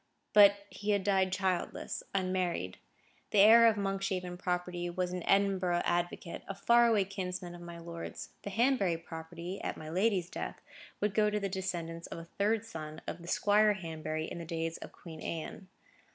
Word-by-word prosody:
But 200 Hz, -1 st, +7 dB
he 200 Hz, +3 st, -5 dB
had 200 Hz, -1 st, +1 dB
died 190 Hz, -1 st, +2 dB
childless, 190 Hz, -1 st, -1 dB
unmarried. 185 Hz, -, -1 dB, 0.5 s
The -, -, 0 dB
heir 225 Hz, +3 st, +9 dB
of 225 Hz, -, +4 dB
the 205 Hz, -, -2 dB
Monkshaven 195 Hz, -2 st, -2 dB
property 180 Hz, -1 st, -2 dB
was 180 Hz, +1 st, -2 dB
an 180 Hz, -, -3 dB
Edinburgh 190 Hz, -3 st, +3 dB
advocate, 175 Hz, -1 st, -1 dB
a 195 Hz, -, -4 dB
far 235 Hz, +4 st, +5 dB
away 215 Hz, -4 st, +3 dB
kinsman 185 Hz, -2 st, -5 dB
of 175 Hz, -, -10 dB
my 170 Hz, 0 st, -8 dB
lord's: 170 Hz, 0 st, -7 dB
the -, -, -5 dB
Hanbury 210 Hz, -5 st, +2 dB
property, 170 Hz, +3 st, -7 dB
at -, -, -3 dB
my 155 Hz, -, -8 dB
lady's 185 Hz, -1 st, +1 dB
death, -, -, -5 dB, 0.4 s
would 210 Hz, -1 st, +1 dB
go 215 Hz, -1 st, +3 dB
to 210 Hz, 0 st, 0 dB
the 200 Hz, -1 st, -2 dB
descendants 170 Hz, -3 st, -4 dB
of -, -, -7 dB
a 165 Hz, -, -8 dB
third 210 Hz, +5 st, 0 dB
son 155 Hz, -5 st, -7 dB
of 170 Hz, -, -5 dB
the 170 Hz, -, -11 dB
Squire 210 Hz, +3 st, +4 dB
Hanbury 160 Hz, -4 st, -4 dB
in 170 Hz, -, -6 dB
the -, -, -5 dB
days 165 Hz, 0 st, -3 dB
of -, -, -9 dB
Queen 160 Hz, -3 st, -11 dB
Anne. 165 Hz, +3 st, -5 dB
185 Hz, 180 wpm, -32 LUFS, 170-200 Hz, 0.5 s, heir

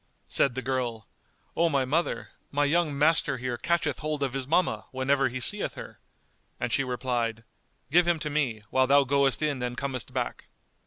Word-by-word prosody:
'" -, -, -42 dB
Said 130 Hz, -3 st, +2 dB
the 130 Hz, -, -3 dB
girl, 120 Hz, -3 st, -2 dB, 0.5 s
"O 170 Hz, 0 st, +3 dB
my 140 Hz, -4 st, +1 dB
mother, 160 Hz, +7 st, -1 dB, 0.2 s
my 145 Hz, +1 st, +1 dB
young 155 Hz, -1 st, +1 dB
master 150 Hz, -2 st, +3 dB
here 125 Hz, 0 st, -3 dB
catcheth 160 Hz, +1 st, 0 dB
hold 150 Hz, -2 st, -2 dB
of 135 Hz, -2 st, -1 dB
his 135 Hz, -1 st, -3 dB
mamma, 145 Hz, -9 st, +1 dB
whenever 135 Hz, +1 st, +1 dB
he 130 Hz, +1 st, -4 dB
seeth 120 Hz, -, 0 dB
her;" -, -, -9 dB, 0.6 s
and 120 Hz, -1 st, -2 dB
she 135 Hz, -, +3 dB
replied 120 Hz, -3 st, -2 dB, 0.5 s
"Give 175 Hz, +2 st, +5 dB
him 175 Hz, -1 st, +3 dB
to 150 Hz, -, -3 dB
me, 125 Hz, -8 st, -1 dB
whilst 130 Hz, 0 st, +3 dB
thou 140 Hz, 0 st, +6 dB
goest 140 Hz, +1 st, +2 dB
in 145 Hz, -4 st, 0 dB
and 125 Hz, 0 st, -3 dB
comest 130 Hz, -5 st, -4 dB
back." -, -, -3 dB
135 Hz, 190 wpm, -27 LUFS, 125-150 Hz, 0.6 s, thou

